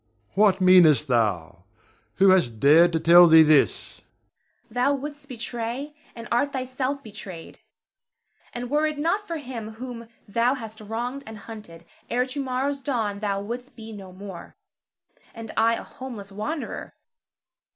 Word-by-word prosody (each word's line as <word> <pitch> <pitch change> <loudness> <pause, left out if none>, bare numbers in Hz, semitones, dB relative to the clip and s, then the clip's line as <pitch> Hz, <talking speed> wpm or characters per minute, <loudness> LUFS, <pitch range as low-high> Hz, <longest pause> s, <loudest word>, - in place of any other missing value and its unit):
What 200 -2 +4
meanest 180 -5 +6
thou? 95 -7 -1 0.5
Who 195 0 +5
has 185 -9 +4
dared 150 +10 +5
to 160 - +1
tell 175 +2 +8
thee 160 -1 +8
this? 155 -2 +2
Zara. - - -26 0.7
Thou 250 +4 +2
wouldst 290 +1 -8
betray, 240 +3 -5 0.2
and 230 0 -8
art 280 +4 +1
thyself 260 +1 -3
betrayed; 200 -6 -10 0.9
and 245 +1 -6
were 300 +1 +2
it 305 -1 -4
not 365 +8 -1
for 335 - -3
him 240 -6 -7
whom 235 0 -8 0.2
thou 235 +5 +1
hast 220 -3 -9
wronged 240 +6 -4
and 220 -1 -8
hunted, 205 -7 -11 0.2
ere 250 +1 +1
to 275 +2 -4
morrow's 270 +2 -2
dawn 225 -7 -2
thou 200 -1 -2
wouldst 245 +5 -7
be 225 -1 -10
no 195 -3 -10
more, 185 -2 -10 0.8
and 225 -1 -8
I 230 +1 +3
a - - -7
homeless 230 -7 -9
wanderer. 275 +10 -5
225 Hz, 150 wpm, -24 LUFS, 190-255 Hz, 0.9 s, tell